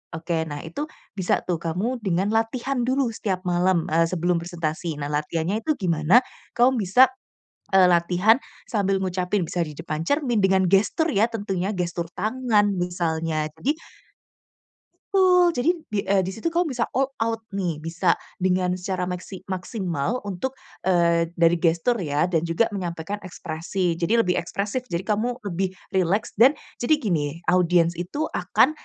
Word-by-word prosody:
Oke, 165 0 -1
nah 145 -1 -5
itu 285 - -5 0.3
bisa 190 -3 +1
tuh 175 -3 -2
kamu 190 +10 -2
dengan 195 +2 +1
latihan 245 +4 0
dulu 260 -1 +1
setiap 190 -4 -2
malam, 175 -1 +2
eee, 165 +1 +3
sebelum 175 0 0
presentasi. 165 -2 -3
Nah 145 - -3
latihannya 160 +7 -1
itu 310 -1 +1
gimana? 180 - +3 0.3
Kamu 245 0 +4
bisa, 215 +7 +5 0.6
eee, 190 -1 +6
latihan 180 +6 +4 0.3
sambil 195 -4 +1
ngucapin, 185 +1 -1
bisa 175 +1 -1
di 150 - -8
depan 155 0 -3
cermin 270 - 0
dengan 190 -1 +4
gestur 215 - +2
ya 210 -5 +3
tentunya, 200 -2 -2
gestur 175 -2 -3
tangan 215 -2 +1
misalnya, 165 -3 -1
jadi 270 - +1 1.4
Betul, 360 -2 +5
jadi 280 +1 0 0.2
di, 210 - 0
eee, 195 -1 +3
di 190 - -3
situ 225 - -4
kamu 335 -2 +1
bisa 240 -2 -1
all 270 +1 +1
out 225 0 -1
nih, 175 -6 -3
bisa 170 +2 +1 0.2
dengan 180 -1 +1
secara 180 0 -2
meksi 180 +1 -6
maksimal 185 - -3
untuk, 205 +7 -4 0.3
eee, 170 -2 +3
dari 170 0 +3
gestur 170 +8 +2
ya 155 +2 0
dan 165 0 +1
juga 170 +7 +1
menyampaikan 180 +1 -4
ekspresi. 175 0 -3
Jadi 175 +7 +2
lebih 180 0 +1
ekspresif. 205 +8 -3
Jadi 170 -1 -3
kamu 225 +4 0
lebih 190 0 -2 0.2
rileks 190 +3 +1
dan 260 +6 +7 0.2
jadi 305 +6 +3
gini, 170 - -2
audiens 175 -2 +3
itu 285 - -3
akan - - +3
185 Hz, 155 wpm, -24 LUFS, 170-225 Hz, 1.4 s, dan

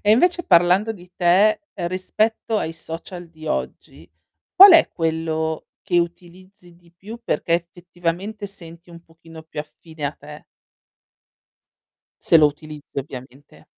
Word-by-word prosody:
E 205 - +1
invece 350 +9 +3
parlando 180 +6 +4
di 180 -4 -15
te, 190 +5 +3
rispetto 205 +5 -2
ai 165 - -3
social 170 +2 -9
di 160 -1 -13
oggi, - - -5 0.5
qual 390 0 +10
è 330 - +6
quello 160 -1 -2 0.2
che 180 -3 +1
utilizzi 175 +1 -7
di 170 -1 -25
più 205 +7 -11
perché 170 - 0
effettivamente 175 +4 -4
senti 170 -3 -14
un 170 0 -13
pochino 165 -1 -15
più 160 -1 -12
affine 155 0 -11
a 145 - -1
te? 150 +1 -13 1.8
Se - - +4
lo 155 -2 +6
utilizzi 150 -1 -7
ovviamente. 135 0 -10
170 Hz, 130 wpm, -21 LUFS, 160-190 Hz, 1.8 s, qual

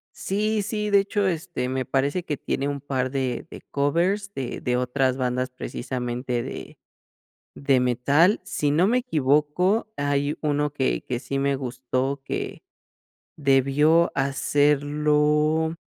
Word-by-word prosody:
Sí, 210 +2 -1
sí, 210 0 -2
de 200 -1 +5
hecho, 200 +1 0
este, 165 -7 -2
me 130 0 -2
parece 140 +6 0
que 150 - -2
tiene 140 0 -2
un 140 -1 -3
par 130 -2 -2
de 130 -3 -2
de - - -10
covers 180 +8 0
de 130 -7 -4
de 125 - -1
otras 125 +1 +1
bandas 125 0 -1
precisamente 125 -1 -3
de - - -8 0.8
de 135 -2 +2
metal. 140 - +3
Si 150 -7 -1
no 165 +6 +3
me 245 +3 +3
equivoco, 180 - +1
hay 145 +1 0
uno 150 -1 0
que 135 -3 -1
que 125 - -2
sí 140 +1 -3
me 140 0 +1
gustó, 130 +1 -3
que - - -4 0.7
debió 145 +4 +3
hacerlo 150 +3 +2
145 Hz, 135 wpm, -24 LUFS, 130-160 Hz, 0.8 s, de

